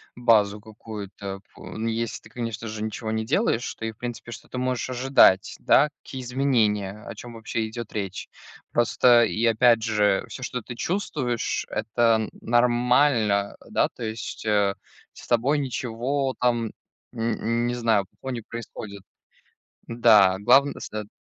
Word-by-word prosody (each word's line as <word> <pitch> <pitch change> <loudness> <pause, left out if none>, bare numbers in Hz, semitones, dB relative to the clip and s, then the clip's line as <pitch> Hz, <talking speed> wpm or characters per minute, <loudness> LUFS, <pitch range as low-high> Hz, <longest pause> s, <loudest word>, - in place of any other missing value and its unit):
базу 105 -4 +3
какую-то 105 -3 -8
пу - - -13
Ну, 110 +1 -4
если 115 0 -2
ты, - - -16
конечно 115 -2 -5
же, 110 0 -5
ничего 110 0 -4
не 110 0 -1
делаешь, 135 - 0
то 110 - -6
и, 110 - -2
в 110 - -21
принципе, 120 -1 -6
что - - -10
ты - - -7
можешь 125 -1 -1
ожидать? 125 -7 +4
Да, 150 - +4
какие 130 - -7
изменения, 110 -6 0
о - - -7
чём 120 -1 -10
вообще 115 0 -3
идёт 115 0 -7
речь. 95 -3 -4 0.4
Просто, 120 0 +4
и 110 - -2
опять 115 0 +4
же, 105 -3 +2
всё, 130 - -8
что 125 -1 -3
ты 120 - -8
чувствуешь,- 135 - -2
это 115 0 +2
н 110 - -4
нормально. 120 -3 +2
Да, - - +2
то 120 - -10
есть, 110 0 -5
э, 100 -2 +2 0.4
с - - -13
тобой 125 +5 +2
ничего 130 +1 -2
там 120 -2 +1 0.4
н 115 +1 -1
не 120 - -1
знаю, 115 -4 +2
плохого 130 - -8
не 120 -2 -4
происходит. 110 -3 -8 0.9
Да, 110 -5 +5
главн 135 +7 +5
сет 105 -1 -6
115 Hz, 155 wpm, -25 LUFS, 110-125 Hz, 0.9 s, Да